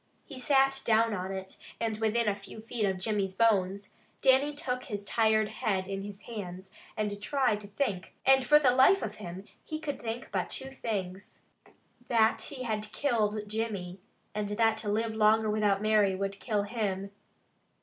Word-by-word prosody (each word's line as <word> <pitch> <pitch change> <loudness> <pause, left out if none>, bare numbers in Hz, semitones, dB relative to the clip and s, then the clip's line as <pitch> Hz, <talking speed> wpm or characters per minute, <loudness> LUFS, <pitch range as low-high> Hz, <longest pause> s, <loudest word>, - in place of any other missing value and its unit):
He 270 -3 -9
sat 270 0 +3
down 225 0 +3
on 185 -1 -3
it, 190 0 -6 0.2
and 220 -2 -2
within 225 +1 +1
a 205 - +2
few 205 +2 -11
feet 225 0 -2
of 190 -1 0
Jimmy's 195 -1 -1
bones, 200 -3 +1 0.3
Dannie 275 +2 +4
took 250 -3 -3
his 205 -6 -5
tired 220 0 +2
head 210 -5 -1
in 195 0 -3
his 200 0 -8
hands, 190 -4 -7 0.3
and 205 -1 -2
tried 245 -3 +1
to 200 - -10
think, 200 -4 -3
and 265 0 +6
for 295 +4 +6
the 275 -4 +4
life 265 +10 +5
of - - -5
him, 185 -1 -8 0.2
he 310 - -5
could 290 -2 -4
think 230 +2 -5
but - - -1
two 265 0 -5
things. 195 -7 -5 0.7
That 225 -1 +3
he 265 0 -5
had 215 -2 -3
killed 215 -6 0
Jimmy, 205 -4 -3 0.3
and 210 -1 -2
that 220 +1 +2
to 210 - -3
live 220 +2 0
longer 220 0 +3
without 210 -1 +1
Mary 210 -3 +3
would 195 +1 -3
kill 210 -4 0
him. 200 -3 -3
215 Hz, 175 wpm, -30 LUFS, 200-235 Hz, 0.7 s, and